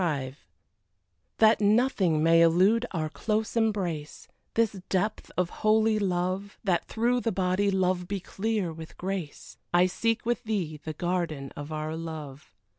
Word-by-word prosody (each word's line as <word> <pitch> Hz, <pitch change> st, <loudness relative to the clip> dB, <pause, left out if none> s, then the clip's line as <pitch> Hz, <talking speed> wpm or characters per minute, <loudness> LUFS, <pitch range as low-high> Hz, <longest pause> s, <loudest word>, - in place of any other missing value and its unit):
XXV 140 Hz, -6 st, -1 dB, 1.0 s
That 220 Hz, -1 st, +5 dB
nothing 205 Hz, -, +3 dB
may 165 Hz, 0 st, +6 dB
elude 190 Hz, +8 st, +4 dB
our 160 Hz, -4 st, -2 dB
close 215 Hz, +8 st, -2 dB
embrace, 190 Hz, -10 st, -1 dB, 0.3 s
This 225 Hz, -3 st, +2 dB
depth 200 Hz, +3 st, -1 dB
of 180 Hz, -1 st, 0 dB
holy 215 Hz, 0 st, +3 dB
love, 185 Hz, +1 st, -1 dB
That 180 Hz, -5 st, +1 dB
through 240 Hz, +2 st, +1 dB
the 230 Hz, -, 0 dB
body 190 Hz, +1 st, +1 dB
love 185 Hz, -2 st, +1 dB
be 200 Hz, +1 st, -2 dB
clear 195 Hz, -2 st, -2 dB
with 160 Hz, 0 st, -10 dB
grace, 185 Hz, -5 st, -5 dB
I 175 Hz, 0 st, +5 dB
seek 225 Hz, +6 st, -1 dB
with 240 Hz, +1 st, 0 dB
thee 185 Hz, -9 st, -2 dB
the 155 Hz, -, -4 dB
garden 165 Hz, -5 st, -2 dB
of 145 Hz, +1 st, -7 dB
our 155 Hz, +1 st, -3 dB
love. 155 Hz, -4 st, -7 dB
185 Hz, 145 wpm, -28 LUFS, 165-215 Hz, 1.0 s, may